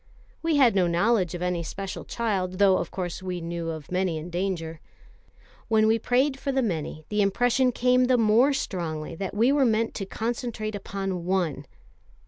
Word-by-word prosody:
We 330 -1 +1
had 265 -5 +5
no 185 -3 +3
knowledge 180 0 +1
of 175 - -4
any 180 -1 -1
special 195 +4 -6
child, 195 -6 -1
though, 195 -1 +5
of - - -3
course, 180 -2 -4
we 180 -1 -4
knew 170 0 -4
of 160 -2 -7
many 180 -2 0
in 160 +3 -7
danger. 170 -3 -3 0.9
When 220 -1 +3
we 225 +1 +3
prayed 265 +4 +1
for 275 - -2
the 265 -1 +1
many, 155 -6 -3
the 210 0 +1
impression 245 +5 +2
came 250 +1 +3
the 250 0 +3
more 230 +5 +4
strongly 165 - -3
that 195 +1 -4
we 230 +5 +4
were 285 -1 +3
meant 225 -2 +1
to 195 - -5
concentrate 225 -1 -3
upon 195 -3 -4
one. 175 -7 -1
195 Hz, 180 wpm, -26 LUFS, 175-235 Hz, 0.9 s, had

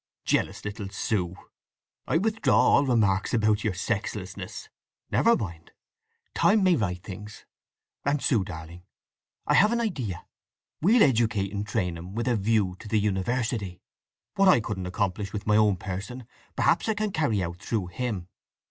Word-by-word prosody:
"Jealous - - 0
little 105 -1 -5
Sue! 95 -3 -2 0.7
I - - +2
withdraw 220 +5 +2
all 140 - +4
remarks 105 -5 +2
about 110 -1 +2
your 105 -4 -1
sexlessness. 100 -2 -4 0.4
Never 235 +1 +4
mind! 85 -6 -7 0.6
Time 210 -1 +4
may 185 -2 +5
right 95 - -1
things… 105 +2 -9 0.6
And 140 +1 +1
Sue, 120 -7 +2
darling; 85 0 -9 0.6
I - - +2
have 210 +2 +5
an 235 - +1
idea! 135 - -3 0.6
We'll 215 +8 +5
educate 110 -6 +2
and 100 +1 -3
train 90 -6 -1
him 90 +4 -9
with 115 +2 -2
a 120 - +3
view 105 -3 +1
to - - -10
the 110 0 +2
university. 105 -1 -1 0.5
What 195 0 +3
I 185 - +7
couldn't 105 -5 -4
accomplish 100 +2 -2
in 105 - -2
my 105 - +3
own 105 -3 +4
person 105 +7 -6 0.3
perhaps 175 - +2
I 220 - +1
can 210 0 -1
carry 130 - +1
out 85 0 -5
through 105 -2 -1
him? 105 -5 -3
105 Hz, 155 wpm, -27 LUFS, 95-125 Hz, 0.7 s, I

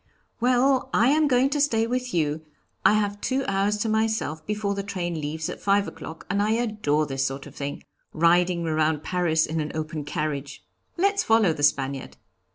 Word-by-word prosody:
'Well, 255 +2 +2
I 235 +4 +4
am 305 +1 +3
going 260 0 +3
to 290 - +1
stay 225 -6 +2
with 250 +1 -2
you; 155 -2 0 0.4
I - - +6
have 205 -1 -1
two 265 +1 -1
hours 195 +2 +1
to - - -2
myself 220 -8 0
before 210 -1 -1
the 200 - -3
train 175 -5 -4
leaves 155 +2 -3
at - - -7
five 200 0 +2
o'clock 160 - -9
and 200 +2 0
I 215 +1 +2
adore 210 -10 0
this 135 -2 -2
sort 135 +1 -3
of - - -12
thing, 140 0 -5 0.3
riding 170 +1 +2
around 155 -1 +1
Paris 170 -3 +1
in 160 +1 -3
an 150 - -4
open 155 -1 -4
carriage. 145 -1 -4 0.3
Let's 400 +3 +2
follow 220 -6 +4
the 150 - -7
Spaniard!' 135 -2 0
185 Hz, 185 wpm, -25 LUFS, 155-225 Hz, 0.4 s, I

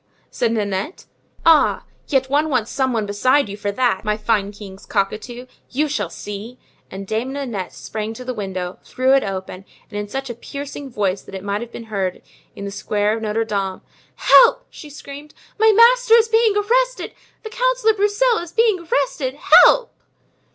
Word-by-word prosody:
said 235 -2 0
Nanette. 205 - -3 0.4
"Ah! 325 -2 +4 0.2
yet 265 -3 +1
one 295 +3 +1
wants 245 -6 -1
some 265 -1 0
one 225 -3 -1
besides 225 +4 +1
you - - -6
for 205 -1 -3
that, 240 -3 0
my 210 -1 -1
fine 210 -2 0
king's 200 -2 -12
cockatoo! 235 +5 -3 0.2
You 295 +4 0
shall 210 - -2
see." 210 +7 -8 0.3
And 195 +1 -7
Dame 225 +6 -2
Nanette 235 - -4
sprang 210 +12 -6
to 250 - -9
the 255 - -3
window, 190 -4 -5
threw 260 +1 +1
it 275 - +4
open, 190 -1 -6 0.3
and 205 - -4
in 205 - -4
such 270 +5 -5
a 240 - -5
piercing 280 +3 -8
voice 200 -5 -1
that - - -11
it 190 - -7
might 200 +1 -2
have 235 0 -8
been 235 - -8
heard 190 -2 -2 0.3
in 200 - -7
the 200 - -5
square 210 +1 -1
of 225 - -6
Notre 220 +1 -1
Dame: 195 -3 -3 0.3
"Help!" - - +5
she 300 - -11
screamed, 290 +1 -11 0.2
"my 440 0 +6
master 470 +2 +6
is 455 -1 +4
being 450 -2 +3
arrested; - - 0 0.3
the 440 - -7
Councillor - - +2
Broussel 425 +4 +2
is 340 -1 -8
being 445 -2 +2
arrested! 270 -1 -1
Help!" 470 +10 +5
245 Hz, 180 wpm, -20 LUFS, 205-310 Hz, 0.4 s, my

